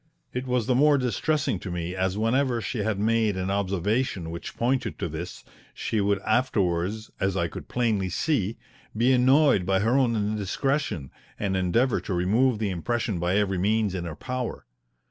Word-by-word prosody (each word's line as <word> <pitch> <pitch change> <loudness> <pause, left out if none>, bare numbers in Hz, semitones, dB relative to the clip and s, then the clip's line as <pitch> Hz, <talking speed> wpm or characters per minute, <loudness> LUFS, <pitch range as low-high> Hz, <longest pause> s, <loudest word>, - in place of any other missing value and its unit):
It 125 +1 -3
was 125 -3 +1
the 125 - +2
more 145 +3 +5
distressing 130 - 0
to 95 - -7
me 90 0 -3
as 95 +1 -1
whenever 120 +3 +1
she 115 +1 -4
had 105 0 0
made 110 -1 +1
an 95 +1 -1
observation 100 0 -1
which 85 - -7
pointed 125 +2 0
to - - -2
this 85 +3 -7 0.3
she 110 - -1
would 100 0 +2
afterwards, 110 -3 0
as 95 0 0
I 85 - +1
could - - -9
plainly 110 -6 0
see, 110 - 0 0.4
be 125 +4 +4
annoyed 130 -3 +4
by 95 +1 +1
her 115 +4 +2
own 125 -4 +3
indiscretion, 105 - -1 0.3
and 100 -2 -1
endeavour 100 +8 +2
to 95 - -3
remove 110 +8 +2
the 105 -2 -1
impression 105 +2 -2
by 90 +3 +1
every 95 -3 +1
means 105 +1 +1
in 90 -2 -3
her 80 -3 -5
power. 125 +2 -4
105 Hz, 175 wpm, -26 LUFS, 95-125 Hz, 0.4 s, more